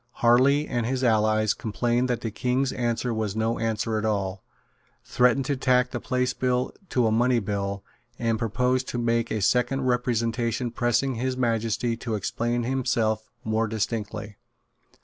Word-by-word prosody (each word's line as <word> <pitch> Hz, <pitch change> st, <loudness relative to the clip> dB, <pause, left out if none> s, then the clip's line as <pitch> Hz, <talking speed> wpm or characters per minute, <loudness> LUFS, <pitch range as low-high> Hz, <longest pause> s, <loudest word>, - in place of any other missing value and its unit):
Harley 130 Hz, +5 st, +4 dB
and 120 Hz, -2 st, -1 dB
his 130 Hz, +1 st, -1 dB
allies 110 Hz, -2 st, +3 dB
complained 120 Hz, +2 st, -1 dB
that 120 Hz, -, -1 dB
the 115 Hz, -, -3 dB
King's 130 Hz, +4 st, 0 dB
answer 120 Hz, 0 st, -1 dB
was 110 Hz, -2 st, -2 dB
no 110 Hz, +1 st, 0 dB
answer 110 Hz, 0 st, -1 dB
at -, -, -4 dB
all, 100 Hz, -3 st, -1 dB, 0.6 s
threatened 125 Hz, +2 st, +2 dB
to 140 Hz, -, 0 dB
tack 125 Hz, -1 st, +2 dB
the 120 Hz, -, -3 dB
Place 125 Hz, 0 st, -1 dB
Bill 125 Hz, 0 st, 0 dB, 0.2 s
to 125 Hz, -2 st, +2 dB
a 110 Hz, -, +2 dB
money 120 Hz, +2 st, +3 dB
bill, 100 Hz, -2 st, -2 dB, 0.3 s
and 115 Hz, -2 st, 0 dB
proposed 125 Hz, +3 st, 0 dB
to -, -, -3 dB
make 115 Hz, -1 st, +1 dB
a 110 Hz, -, -2 dB
second 125 Hz, +5 st, +2 dB
representation 120 Hz, -1 st, 0 dB
pressing 120 Hz, +3 st, +1 dB
His 130 Hz, +2 st, -2 dB
Majesty 115 Hz, -1 st, 0 dB
to 115 Hz, -1 st, -3 dB
explain 120 Hz, +4 st, -1 dB
himself 115 Hz, -4 st, 0 dB
more 110 Hz, +1 st, 0 dB
distinctly. 105 Hz, -1 st, -3 dB
120 Hz, 155 wpm, -25 LUFS, 110-125 Hz, 0.6 s, Harley